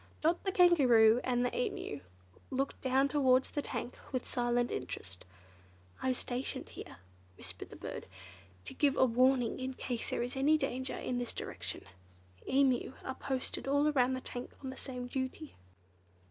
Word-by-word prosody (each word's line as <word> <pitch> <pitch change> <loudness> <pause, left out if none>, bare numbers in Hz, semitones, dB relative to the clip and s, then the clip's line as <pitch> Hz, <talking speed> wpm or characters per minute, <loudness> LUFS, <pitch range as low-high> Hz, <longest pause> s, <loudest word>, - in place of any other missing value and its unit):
Dot, 335 +3 +2
the 385 - +1
Kangaroo, 250 - +6
and 245 -1 +1
the - - -2
Emu 450 - -2 0.5
looked 270 +1 -2
towards 265 0 +3
the 290 - -1
tank 250 - -5
with 255 -2 -2
silent 240 0 +1
interest. 95 -8 -5 0.8
"I'm 260 -1 +1
stationed 250 +1 -3
here," - - -9 0.4
whispered - - -8
the - - -10
bird, - - -7 0.6
"to - - -6
give 285 -2 +2
a - - +6
warning 250 0 +3
in 260 0 -3
case 245 -3 -3
there - - -1
is 245 +2 -4
any 290 +4 +4
danger 260 -3 -2
in 250 -1 -2
this 245 - -3
direction. - - -3 0.7
Emu 265 -2 +3
are 265 - -2
posted 265 0 -3
all 285 +2 +3
round 260 -2 +3
the 260 - -5
tank 245 0 -6
on 265 - -4
the - - -8
same 250 -2 -5
duty." 260 +4 -4
260 Hz, 160 wpm, -33 LUFS, 245-275 Hz, 0.8 s, Kangaroo